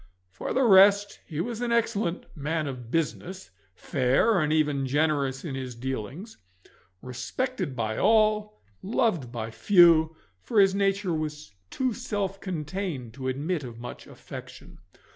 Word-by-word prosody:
For 95 - -5
the 265 - +2
rest, 200 -1 +6
he 155 -2 -5
was 235 +3 -4
an 240 -1 -1
excellent 215 -6 0
man 155 +1 -2
of 125 -4 -6
business, 165 - -3 0.2
fair 140 - +2
and 150 0 0
even 150 -3 +1
generous 140 -1 0
in 150 - -4
his 130 -2 -5
dealings, 130 - -6 0.7
respected 135 - -3
by 110 -2 -2
all 215 0 +2 0.2
and 205 +5 -6
loved 175 - +1
by 115 -2 -5
few, 165 - +5 0.3
for 220 - +1
his 195 -1 +5
nature 195 -2 0
was 155 -5 -5 0.2
too 255 -2 -1
self 205 -5 -3
contained 160 - -4
to 130 +1 -6
admit 145 +5 -2
of 120 -3 -8
much 120 +1 -9
affection. - - -11
160 Hz, 145 wpm, -27 LUFS, 130-200 Hz, 0.7 s, rest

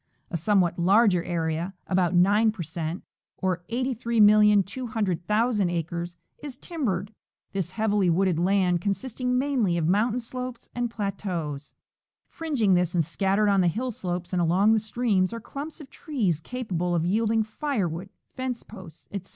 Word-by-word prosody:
A 170 - -1
somewhat 180 0 +2
larger 190 0 +4
area 170 +1 -2
— - - -43
about 180 -1 +2
9 205 +5 +4
per 205 -5 -6
cent, 165 +2 -5 0.3
or 185 -2 -1
83,200,000 215 -3 +2
acres 170 +1 -3
— - - -36
is 285 -3 -7
timbered, 220 - -3 0.4
this 185 -2 -3
heavily 210 -4 +1
wooded 175 -1 +2
land 180 -1 +2
consisting 250 +5 -1
mainly 250 -10 +1
of 160 -2 0
moun 210 +6 +2
tain 250 - -1
slopes 250 0 -7
and 240 0 -1
plateaus. 180 -9 -4 0.5
Fringing 275 - 0
this 180 0 +1
and 165 -3 +2
scattered 195 +5 +1
on 200 -2 +4
the 180 - +3
hill 245 +9 -1
slopes 180 -3 -4
and 180 - +2
along 185 +6 +4
the 220 - +3
streams 215 -4 0
are 230 - -4
clumps 285 +8 -7
of 285 -3 -12
trees 210 - -1
capable 180 -6 -2
of 165 -1 +1
yielding 220 +4 +2
firewood, 210 - -3 0.2
fence 255 -2 -4
posts, 185 -7 -13
etc. 195 -2 -6
200 Hz, 155 wpm, -26 LUFS, 175-230 Hz, 0.5 s, larger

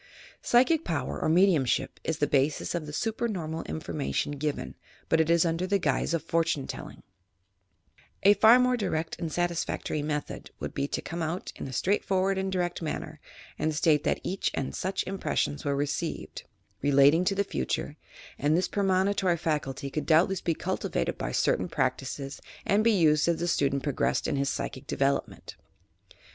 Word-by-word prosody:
Psychic 275 +7 +3
power 165 - -2
or - - +1
mediumship 165 -6 +2
is 160 - -1
the 145 - +2
basis 145 +1 +1
of 170 -3 -3
the - - -6
supernormal 185 -5 -2
information 80 - -3
given, 145 0 -3 0.4
but 160 - +4
it 160 - 0
is 170 0 +4
under 170 +2 0
the 200 +1 +2
guise 175 -2 0
of 165 - -3
fortune 165 -4 0
telling, - - -8 1.2
A 200 +1 +8
far 220 +3 +7
more 250 0 +3
direct 165 -8 -2
and 165 -2 -3
satisfactory 170 -2 -1
method 150 0 -4
would - - -5
be 140 - -1
to - - -3
come 170 +1 -5
out 165 +3 -3
in - - -6
a - - -7
straight 190 +10 +1
for 190 -1 +1
ward 195 0 +1
and 190 0 -2
direct 175 -2 -1
manner, 155 - -4 0.4
and 155 0 0
state 150 -1 +3
that - - 0
such 190 +1 -1
and 135 - -3
such 190 +2 -2
impressions 185 -6 -2
were 140 -1 0
received, 145 +3 -3 0.4
relating 145 +4 +5
to 195 - +1
the 200 - +2
future, 65 - -3 0.4
and 150 +3 +2
this 185 - +1
premonitory 190 -2 +1
faculty 140 -4 -2
could 155 - -3
doubtless 175 +4 +3
be 165 - 0
cultivated - - -2
by - - -2
certain - - +1
practices 135 0 -2 0.2
and 205 +2 +3
be 230 - +4
used 155 -7 +3
as 170 -1 +1
the 175 - -1
student 140 -4 +1
progressed 145 -3 0
in - - 0
his 140 0 0
psychic 130 - -4
develop 140 0 +1
ment. - - -12
165 Hz, 175 wpm, -28 LUFS, 145-190 Hz, 1.2 s, A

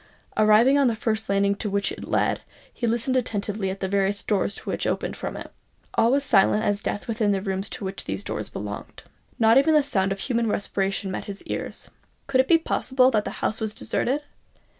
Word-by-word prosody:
Arrived 215 +5 +5
on 280 -2 +4
the 230 - +1
first 220 -1 -2
landing 200 0 +3
to 205 +1 -4
which 200 0 0
it - - -7
led, - - 0 0.3
he 235 - -2
listened 235 +3 +1
attentively 205 -4 -1
at 190 +1 -5
the 190 - 0
various 200 +1 0
doors 200 -1 0
which - - -2
opened - - -2
from - - -5
it. - - -8 0.4
All 230 - +3
was 280 +1 +2
silent 210 -4 +4
as 205 0 +1
death 205 - -3
within 220 -3 +1
the 195 - 0
rooms 195 +1 -3
to 200 - -6
which 190 +1 -5
those - - -4
doors - - -4
belonged. - - -7 0.3
Not 225 +2 +6
even 315 +3 +3
the 300 - +5
sound 195 -9 +1
of 195 0 -3
human 235 -3 0
respiration 195 -2 -1
met - - -4
his 200 -1 -7
ears. - - -4 0.3
Could 260 -2 +3
it 260 - -5
be 335 - +6
possible 260 -5 +2
that 210 -3 +1
the - - -2 0.2
house 220 - -1
was 220 -1 -1
deserted? 275 +6 -1
215 Hz, 210 wpm, -25 LUFS, 200-245 Hz, 0.4 s, Not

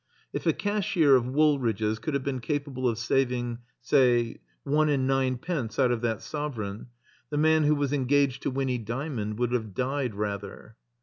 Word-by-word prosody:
If - - -3
a - - +5
cashier 190 -8 +2
of 125 -1 +2
Wool 145 +2 +3
ridge's 110 -2 -1
could 140 +6 -3
have 140 - -1
been 135 -2 -2
capable 135 -1 -2
of 115 - -2
saving, 120 0 0 0.2
say, 120 -3 +3 0.2
one 150 +2 +2
and 135 -3 +1
ninepence 130 - -1
out 130 -3 +3
of 120 -2 -1
that 115 -3 -1
sovereign, 115 -10 -5 0.4
the 145 - -2
man 155 0 +4
who 150 +1 +4
was 145 -1 -1
engaged 140 -1 +2
to - - -1
Winny 130 -2 -1
Dymond 115 -2 -4
would 120 0 0
have 110 -6 -2
died 130 -3 -1
rather. 105 +1 -5
130 Hz, 175 wpm, -27 LUFS, 115-145 Hz, 0.4 s, a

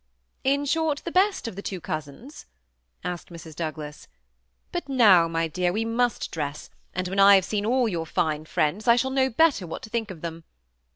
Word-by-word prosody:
*' - - -45
In 285 +1 -1
short, 315 0 0
the 340 - -3
best 380 - +2
of 230 - -6
the 200 - -6
two 190 -2 -5
cousins? 155 - -7 0.3
" - - -44
asked 180 -1 -5
Mrs. 165 -2 -11
Douglas; 155 -2 -6 0.7
'^but 350 -5 -4
now, 205 -10 +6
my 165 0 -1
dear, 175 +2 0
we 220 +4 -1
must 235 +1 0
dress, 150 -2 -5 0.2
and 185 0 -1
when 195 +2 -2
I 200 0 +8
have 190 -2 +3
seen 210 +1 -2
all 250 0 +2
your 170 -6 -3
fine 155 0 -1
friends, 165 +8 -1
I 235 - +7
shall 265 +2 0
know 265 0 +2
better 265 - +2
what 160 - -7
to 220 - -10
think 230 -2 -2
of 175 -5 -9
them. 165 -1 -6
195 Hz, 210 wpm, -25 LUFS, 165-245 Hz, 0.7 s, I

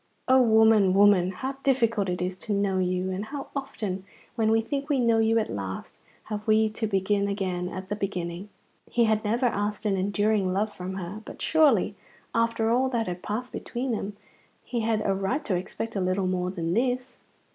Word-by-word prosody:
O 260 0 +6
woman, 220 -4 +5
woman, 200 -3 +5
how 260 +9 -4
difficult 230 -7 +2
it 180 0 -1
is 180 0 -2
to 210 - -3
know 200 -1 +1
you, 185 0 0
and 190 +3 -3
how 275 +3 -6
often, 210 -9 -4 0.3
when 225 -2 +1
we 225 +1 +4
think 280 +5 -3
we 285 - +2
know 230 -2 +3
you 225 +1 +3
at 220 - +1
last, 95 -1 -6 0.2
have 210 0 -6
we 220 0 +4
to 220 +1 -2
begin 200 0 +1
again 185 -3 -2
at 185 +1 -7
the 205 - -1
beginning! 185 -1 -4 0.4
He 240 - +2
had 220 -1 +2
never 230 +4 +1
asked 210 -1 -1
an 200 -2 +1
enduring 205 0 +1
love 205 +3 0
from 185 +1 -6
her; 190 +3 -6
but - - -10
surely, 290 - +3 0.4
after 230 -1 +1
all 255 +2 +2
that 235 -3 0
had 180 -2 -5
passed 230 +4 -4
between 250 +1 -3
them, 205 -2 -3 0.5
he 240 - -3
had 220 -1 0
a 195 - +2
right 195 +9 -1
to 200 - 0
expect 200 +5 -4
a 195 - 0
little 185 +1 0
more 180 -1 0
than 170 -3 -2
this. 250 +3 -1
210 Hz, 200 wpm, -26 LUFS, 190-230 Hz, 0.5 s, O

